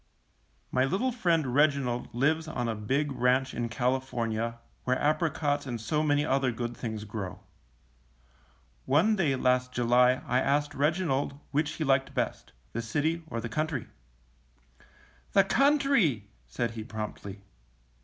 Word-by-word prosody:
My 130 Hz, -, +2 dB
little 195 Hz, -, 0 dB
friend 165 Hz, -, +1 dB
Reginald 140 Hz, -4 st, +1 dB
lives 150 Hz, +6 st, +1 dB
on 120 Hz, -6 st, -2 dB
a 115 Hz, -, 0 dB
big 135 Hz, +8 st, -1 dB
ranch 130 Hz, +1 st, +1 dB
in 120 Hz, -1 st, -2 dB
California, 115 Hz, -2 st, -1 dB, 0.3 s
where 130 Hz, 0 st, +1 dB
apricots 150 Hz, -2 st, 0 dB
and 120 Hz, -2 st, -3 dB
so 150 Hz, +8 st, 0 dB
many 145 Hz, -1 st, +2 dB
other 135 Hz, -2 st, +1 dB
good 120 Hz, 0 st, -4 dB
things 110 Hz, -3 st, -5 dB
grow. 105 Hz, -4 st, -6 dB, 1.4 s
One 170 Hz, +11 st, +3 dB
day 155 Hz, -9 st, +1 dB
last 125 Hz, 0 st, +1 dB
July 125 Hz, +1 st, +3 dB
I 125 Hz, -, +2 dB
asked 145 Hz, +2 st, +1 dB
Reginald 145 Hz, -2 st, 0 dB
which 150 Hz, +1 st, 0 dB
he 160 Hz, -, -3 dB
liked 135 Hz, -2 st, +1 dB
best, -, -, -2 dB, 0.2 s
the 115 Hz, -, -2 dB
city 150 Hz, +8 st, -1 dB
or 115 Hz, -, -4 dB
the 115 Hz, -, -4 dB
country. 155 Hz, +1 st, -2 dB, 1.5 s
^^The 195 Hz, -1 st, +5 dB
country,'^ 275 Hz, -, +3 dB, 0.2 s
said 110 Hz, -, -2 dB
he, 110 Hz, -1 st, -6 dB
promptly. 105 Hz, -3 st, -7 dB
130 Hz, 135 wpm, -29 LUFS, 120-150 Hz, 1.5 s, ^^The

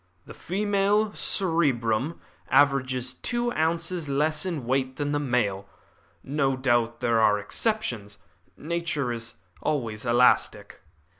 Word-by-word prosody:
"The -, -, -11 dB
female 205 Hz, +2 st, 0 dB
cerebrum 145 Hz, -, +1 dB, 0.3 s
averages 130 Hz, -3 st, +2 dB
two 240 Hz, -, -2 dB
ounces 165 Hz, -1 st, -1 dB
less 150 Hz, +4 st, +1 dB
in 155 Hz, -9 st, -4 dB
weight 130 Hz, +1 st, 0 dB
than 145 Hz, -1 st, -2 dB
the 145 Hz, -, 0 dB
male. 105 Hz, -8 st, -1 dB, 0.5 s
No 135 Hz, -1 st, 0 dB
doubt 120 Hz, -3 st, +1 dB
there 115 Hz, -2 st, +2 dB
are 105 Hz, -1 st, +4 dB
exceptions. 110 Hz, -, -2 dB, 0.4 s
Nature 155 Hz, -5 st, -2 dB
is 115 Hz, 0 st, -3 dB, 0.3 s
always 115 Hz, -8 st, -2 dB
elastic." 120 Hz, +1 st, +2 dB
140 Hz, 115 wpm, -26 LUFS, 120-170 Hz, 0.5 s, are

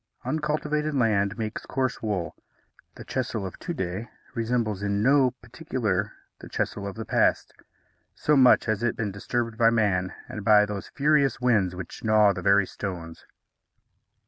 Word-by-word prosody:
Uncultivated 150 Hz, 0 st, -1 dB
land 105 Hz, -6 st, +1 dB
makes 110 Hz, -1 st, -5 dB
coarse 130 Hz, -2 st, -2 dB
wool. 100 Hz, -6 st, -2 dB, 0.6 s
The -, -, -10 dB
Chesil 120 Hz, -5 st, -3 dB
of 95 Hz, -, -8 dB
to 175 Hz, -, -5 dB
day 100 Hz, -, -4 dB, 0.2 s
resembles 115 Hz, -4 st, -1 dB
in 100 Hz, 0 st, 0 dB
no 135 Hz, +1 st, +5 dB
particular 115 Hz, -, -3 dB, 0.3 s
the -, -, -11 dB
Chesil 100 Hz, -1 st, -3 dB
of 100 Hz, -, -6 dB
the 115 Hz, 0 st, -6 dB
past, -, -, +1 dB, 0.6 s
so 150 Hz, -, +2 dB
much 130 Hz, -3 st, +6 dB
has 110 Hz, -2 st, -1 dB
it 120 Hz, -1 st, 0 dB
been 105 Hz, -3 st, -2 dB
disturbed 115 Hz, +3 st, -3 dB
by 115 Hz, -1 st, +6 dB
man 100 Hz, -5 st, +1 dB, 0.2 s
and 105 Hz, -, -7 dB
by 105 Hz, -1 st, +6 dB
those 105 Hz, -1 st, -6 dB
furious 145 Hz, -1 st, +2 dB
winds 105 Hz, -8 st, +2 dB
which 90 Hz, -1 st, -8 dB
gnaw 110 Hz, -2 st, +4 dB
the 90 Hz, -, -5 dB
very 100 Hz, +1 st, +4 dB
stones. 85 Hz, -4 st, -7 dB
110 Hz, 155 wpm, -26 LUFS, 100-125 Hz, 0.6 s, much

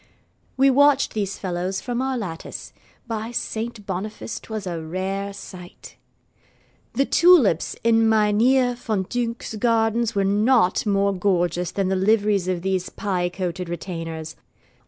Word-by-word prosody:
We 270 Hz, +1 st, +5 dB
watched 285 Hz, +1 st, +4 dB
these 200 Hz, -3 st, -2 dB
fellows 185 Hz, +1 st, -3 dB
from 245 Hz, -1 st, -3 dB
our 265 Hz, -1 st, -1 dB
lattice. 175 Hz, -8 st, -7 dB, 0.3 s
By 225 Hz, -1 st, -4 dB
Saint 225 Hz, -2 st, -4 dB
Boniface 210 Hz, +4 st, -5 dB
'twas 215 Hz, -3 st, -6 dB
a 170 Hz, -3 st, -4 dB
rare 190 Hz, +4 st, -3 dB
sight! 185 Hz, -2 st, -11 dB, 1.0 s
The 275 Hz, -, +2 dB
tulips 310 Hz, -, +4 dB
in 225 Hz, -1 st, +4 dB
Mynheer 225 Hz, +4 st, +3 dB
Van 220 Hz, -5 st, -2 dB
Dunck's 235 Hz, +2 st, -3 dB
gardens 230 Hz, 0 st, +1 dB
were 200 Hz, -, +2 dB
not 210 Hz, 0 st, +2 dB
more 200 Hz, 0 st, +2 dB
gorgeous 180 Hz, -2 st, 0 dB
than 195 Hz, -2 st, -1 dB
the 190 Hz, -, +1 dB
liveries 205 Hz, -1 st, +2 dB
of 180 Hz, -2 st, -2 dB
these 190 Hz, -1 st, -1 dB
pie 180 Hz, -3 st, -2 dB
coated 180 Hz, -1 st, -4 dB
retainers. 165 Hz, -2 st, -5 dB
200 Hz, 135 wpm, -23 LUFS, 185-230 Hz, 1.0 s, We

